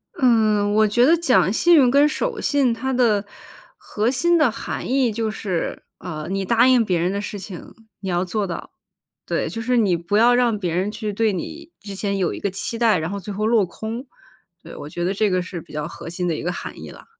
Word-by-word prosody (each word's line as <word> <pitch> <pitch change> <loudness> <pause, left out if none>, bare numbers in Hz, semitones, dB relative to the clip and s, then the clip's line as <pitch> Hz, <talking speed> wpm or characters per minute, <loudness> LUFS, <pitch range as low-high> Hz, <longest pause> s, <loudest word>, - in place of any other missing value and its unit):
嗯， 215 -5 +3
我 215 0 +4
觉 240 +4 +3
得 325 - +6
“讲 265 - +3
信 345 +9 +4
用 260 -6 +5
跟 285 +2 +5
守 465 +8 -2
信” 275 -5 +2
它 265 +4 -3
的 230 -5 +2 0.5
核 215 +2 -2
心 345 +6 +2
的 305 -5 +4
含 - - -5
义 260 -3 +2
就 220 +1 -2
是， 195 -5 -3 0.2
呃， 155 -4 -6
你 195 0 -1
答 235 +5 +4
应 250 -3 +5
别 180 -5 0
人 175 +2 0
的 200 +1 -2
事 205 0 -5
情， 185 -2 -9 0.3
你 190 - -5
要 175 +1 0
做 200 +2 -2
到。 170 - -6 0.5
对， - - -1
就 225 - -5
是 245 +2 +1
你 200 -6 +3
不 170 +5 -1
要 240 +2 +5
让 245 -3 +2
别 175 -4 -2
人 190 +4 0
去 210 -1 -4
对 220 +1 +1
你 325 - -7
之 200 -1 -8
前 200 0 -2
有 180 -3 0
一 - - -6
个 200 - -1
期 195 +4 -4
待， 225 -4 +4
然 160 0 -3
后 200 +1 -4
最 200 +2 -7
后 215 +2 -2
落 225 -3 +3
空。 220 +8 -6 0.6
对， - - -11
我 145 - -8
觉 175 +2 -4
得 185 +2 0
这 210 +1 +1
个 185 0 +1
是 180 -2 -7
比 - - -17
较 150 0 -4
核 165 - -9
心 180 +1 -3
的 165 - 0
一 - - -5
个 175 - -1
含 175 - -7
义 - - -8
啦。 - - -14
210 Hz, 260 characters per minute, -22 LUFS, 185-240 Hz, 0.6 s, 得